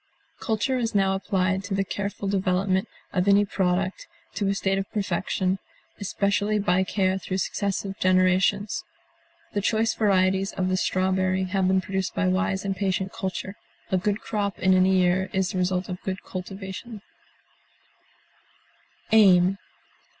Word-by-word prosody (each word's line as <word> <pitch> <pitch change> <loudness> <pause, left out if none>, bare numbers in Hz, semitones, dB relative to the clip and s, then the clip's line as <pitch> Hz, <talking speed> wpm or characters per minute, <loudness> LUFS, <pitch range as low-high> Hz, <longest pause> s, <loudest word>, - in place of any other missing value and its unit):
Culture 240 +3 0
is 230 -3 -2
now 195 -1 +3
applied 190 -1 0
to 200 -1 -2
the 195 - +1
careful 200 +1 -4
development 190 -1 +1 0.3
of 180 0 +1
any 200 +1 +5
product 185 -1 -1 0.3
to 205 - -1
a 195 - +1
state 195 0 0
of 195 - -5
perfection, 190 -2 -1 0.4
especially 200 +1 0
by 190 -2 +2
care 190 0 0
through 185 0 -3
successive 195 0 -2
generations; 185 +2 +2 0.7
the 205 - 0
choice 220 +2 +1
varieties 190 -2 +2
of 185 -1 -1
the 185 - +1
strawberry 185 0 +1
have 185 0 0
been 190 0 +3
produced 190 0 -3
by 185 - +1
wise 190 +1 0
and 195 -1 -1
patient 190 0 -1
culture; 195 -2 -4 0.4
a 190 - +3
good 205 +2 -1
crop 200 -2 -2
in 190 0 +3
any 185 +1 +4
year 185 +1 +2
is 190 -2 0
the 185 - -2
result 180 0 0
of 180 -1 -6
good 190 -1 -4
cultivation. 195 +3 -7 2.1
AIM. 195 -3 +5
190 Hz, 145 wpm, -25 LUFS, 185-200 Hz, 2.1 s, any